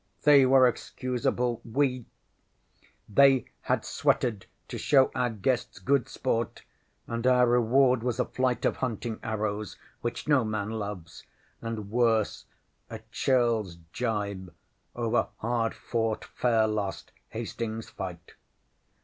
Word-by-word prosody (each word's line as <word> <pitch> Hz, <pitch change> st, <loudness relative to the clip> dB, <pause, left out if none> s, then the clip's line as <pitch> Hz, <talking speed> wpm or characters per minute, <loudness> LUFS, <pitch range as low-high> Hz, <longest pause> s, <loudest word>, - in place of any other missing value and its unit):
They 140 Hz, -3 st, +7 dB
were 130 Hz, 0 st, +6 dB
excusable! 125 Hz, -1 st, -2 dB
We 130 Hz, 0 st, 0 dB, 1.0 s
they 135 Hz, +3 st, +5 dB, 0.2 s
had -, -, 0 dB
sweated 110 Hz, -6 st, 0 dB, 0.2 s
to -, -, -5 dB
show 135 Hz, -2 st, +4 dB
our 125 Hz, -1 st, 0 dB
guests 120 Hz, +3 st, -1 dB
good 140 Hz, -1 st, +1 dB
sport, 115 Hz, -3 st, -2 dB, 0.4 s
and 115 Hz, +1 st, -2 dB
our 125 Hz, -1 st, +5 dB
reward 125 Hz, +1 st, +3 dB
was 120 Hz, -1 st, -2 dB
a -, -, +2 dB
flight 130 Hz, -1 st, -1 dB
of -, -, +1 dB
hunting 115 Hz, -2 st, -3 dB
arrows 105 Hz, -1 st, -3 dB, 0.2 s
which 120 Hz, +4 st, -4 dB
no 145 Hz, -5 st, +4 dB
man 110 Hz, -1 st, -2 dB
loves, 105 Hz, -6 st, -6 dB, 0.3 s
and 110 Hz, -3 st, -5 dB
worse, 115 Hz, -2 st, +1 dB, 0.4 s
a 110 Hz, -1 st, -7 dB
churlŌĆÖs 115 Hz, -9 st, +1 dB, 0.2 s
jibe 100 Hz, -6 st, -2 dB, 0.4 s
over 120 Hz, 0 st, +1 dB
hard 115 Hz, 0 st, -1 dB
fought, 115 Hz, -2 st, -2 dB
fair 115 Hz, -3 st, +1 dB
lost 105 Hz, -3 st, -3 dB, 0.2 s
Hastings 115 Hz, -1 st, -5 dB
fight. 90 Hz, -3 st, -7 dB
115 Hz, 120 wpm, -28 LUFS, 110-125 Hz, 1.0 s, They